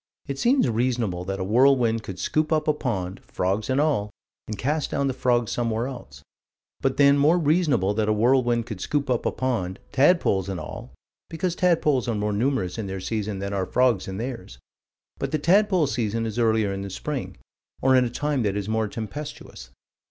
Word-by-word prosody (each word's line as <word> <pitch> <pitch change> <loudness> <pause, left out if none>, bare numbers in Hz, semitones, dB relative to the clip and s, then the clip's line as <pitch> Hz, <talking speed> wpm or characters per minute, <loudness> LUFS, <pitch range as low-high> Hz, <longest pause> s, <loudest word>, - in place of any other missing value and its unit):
It 140 -1 -5
seems 255 - +3
reasonable 115 -6 -1
that 95 +1 -3
a - - -1
whirlwind 120 +1 +3
could 95 -4 -8
scoop 155 0 0
up 155 -1 +1
a 155 - +4
pond, 95 -10 -3
frogs 100 +5 -2
and 130 +1 +2
all, 145 -9 +1 0.4
and 105 - -5
cast 145 +6 -1
down 140 - -1
the 135 - 0
frogs 120 -3 +1
somewhere 115 -1 -1
else: 70 - -9 0.6
but, 135 -1 0
then, 140 0 +5
more 155 +5 +4
reasonable 150 - +2
that 110 0 0
a - - +4
whirlwind 120 +1 +2
could 110 -6 -7
scoop 145 -2 -1
up 120 - 0
a - - +1
pond, 115 -8 -2
tadpoles 130 - +3
and 95 -2 -3
all - - -8 0.4
because 165 +2 -2
tadpoles 155 -8 +2
are 115 - 0
more 105 0 -1
numerous 115 -3 -1
in 105 - -3
their 95 0 -4
season 105 +1 -3
than 100 +1 -4
are 95 -1 0
the - - -18
frogs 125 -6 +2
in 95 0 -5
theirs: 115 - -6 0.6
but - - -2
the 155 - +1
tadpole 185 +2 +3
season 115 -4 -1
is 110 +1 -3
earlier 110 -3 +2
in 95 - -4
the 100 - -5
spring, 140 +8 -5 0.5
or 130 0 +5
in 130 - +5
a 120 - -1
time 145 +2 -1
that 100 -2 0
is 100 -1 -3
more 110 0 0
tempestuous. 110 - -7
120 Hz, 200 wpm, -24 LUFS, 100-140 Hz, 0.6 s, then